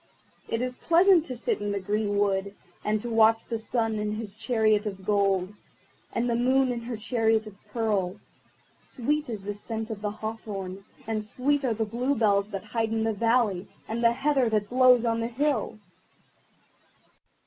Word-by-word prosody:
It 230 +2 -1
is 255 0 -2
pleasant 345 0 +5
to 255 - -5
sit 230 - -1
in 205 0 -2
the 200 - -1
green 205 +1 -1
wood, 200 0 0 0.3
and 215 0 +1
to 240 - -5
watch 225 0 +4
the 230 -2 -3
Sun 225 -1 -1
in 210 0 -2
his 215 -2 -5
chariot 220 -2 +1
of 195 -2 -6
gold, 195 -2 +1 0.6
and 240 - -1
the 235 - +1
Moon 255 +2 +3
in 240 -1 -3
her 235 -1 -5
chariot 225 -1 +1
of 215 - -9 0.2
pearl. 205 -6 0 0.6
Sweet 295 +3 -2
is 215 -4 -5
the 205 +1 -3
scent 220 +2 -5
of 210 -2 -6
the 210 - -1
hawthorn, 205 -3 -6 0.2
and 215 -1 -2
sweet 275 +6 0
are 240 -4 +1
the 220 +1 -1
bluebells 220 -3 +1
that 195 -3 -5
hide 225 +1 -1
in 225 0 0
the 225 0 +1
valley, 225 -4 +1 0.2
and 230 +2 -3
the 230 0 +5
heather 270 -1 +2
that 215 -1 -1
blows 250 -1 +5
on 230 0 +1
the 230 - -1
hill. 250 -2 -1
225 Hz, 180 wpm, -27 LUFS, 205-240 Hz, 0.6 s, pleasant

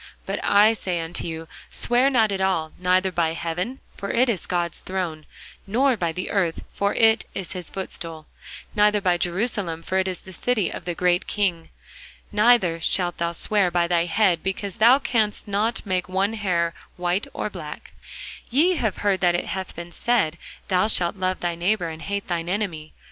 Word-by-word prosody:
But - - -3
I 210 +2 +5
say 185 -5 -2
unto 165 +1 -3
you, 165 0 -6 0.2
Swear 245 +3 +3
not 225 -6 +3
at 195 -1 -2
all; 165 -5 0
neither 185 +1 +2
by 165 -2 +1
heaven; 175 +10 -3
for 200 - -5
it 250 +2 +3
is 200 -8 -1
God's 175 -2 -1
throne: 175 -5 -4 0.4
nor 255 +6 +3
by 170 -6 -1
the 180 +3 -4
earth; 180 -5 0
for 200 0 0
it 225 0 +4
is 190 -4 -5
his 180 -2 -4
footstool: 165 -4 -5 0.5
neither 210 0 +4
by 180 -3 +1
Jerusalem; 175 -3 -1
for 190 +2 0
it 190 - 0
is 185 -2 -4
the 190 - -12
city 215 -1 0
of - - -7
the 175 -1 -2
great 180 0 +1
King. 180 -5 -1 0.6
Neither 210 -6 +4
shalt 175 +1 +1
thou 170 0 0
swear 200 +2 +1
by 175 0 +2
thy 170 -1 +2
head, 180 -2 +2
because 195 +2 -3
thou 235 +4 +7
canst 220 -7 0
not 210 +4 -1
make 185 -2 -1
one 195 +3 +1
hair 175 -6 0 0.2
white 180 +3 0
or - - -4
black. - - -8 0.6
Ye 325 +8 +3
have 220 -8 -1
heard 195 -2 +3
that 175 -1 +3
it 175 - -1
hath 190 -1 -4
been 170 +1 -8
said, 175 -7 +1 0.3
Thou 185 +2 +3
shalt 175 -5 +1
love 185 -1 -1
thy 175 -1 0
neighbour, 175 +1 0
and 160 0 -8
hate 200 0 -3
thine 170 -1 -2
enemy. 180 -6 -3
185 Hz, 185 wpm, -24 LUFS, 170-210 Hz, 0.6 s, thou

